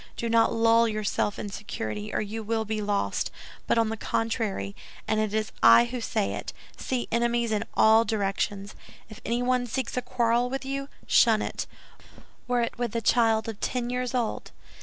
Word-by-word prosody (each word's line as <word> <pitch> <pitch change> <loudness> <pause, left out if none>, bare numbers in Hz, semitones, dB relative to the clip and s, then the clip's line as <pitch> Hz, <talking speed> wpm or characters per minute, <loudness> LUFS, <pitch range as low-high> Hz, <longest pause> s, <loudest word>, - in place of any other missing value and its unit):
Do 235 - -2
not 230 0 +4
lull 230 0 +4
yourself 215 -1 -1
in 205 - -5
security, 110 - -5
or - - 0
you 215 +2 -4
will 220 +1 -1
be 215 0 -2
lost; 205 -1 -1 0.4
but, - - +2
on 225 -1 +3
the 225 - -3
contrary—and 215 - -3
it 215 -1 0
is 215 0 -1
I 115 - +8
who 240 0 -5
say 215 -2 -1
it—see 255 -2 -5
enemies 235 0 +1
in 210 -1 0
all 220 +1 +6
directions. 200 -2 -2 0.4
If 215 - -12
anyone 245 +1 0
seeks 255 +1 -3
a - - +2
quarrel 240 0 +1
with 270 +1 -4
you, 275 +1 -4 0.2
shun 220 -2 +4
it, - - -4 0.8
were 245 -1 +1
it 235 - -3
with 235 -2 -2
a 230 - 0
child 225 0 +3
of 220 -2 -6
ten 245 -1 -2
years 250 +1 -2
old. 235 -3 -2
225 Hz, 175 wpm, -27 LUFS, 215-240 Hz, 0.8 s, I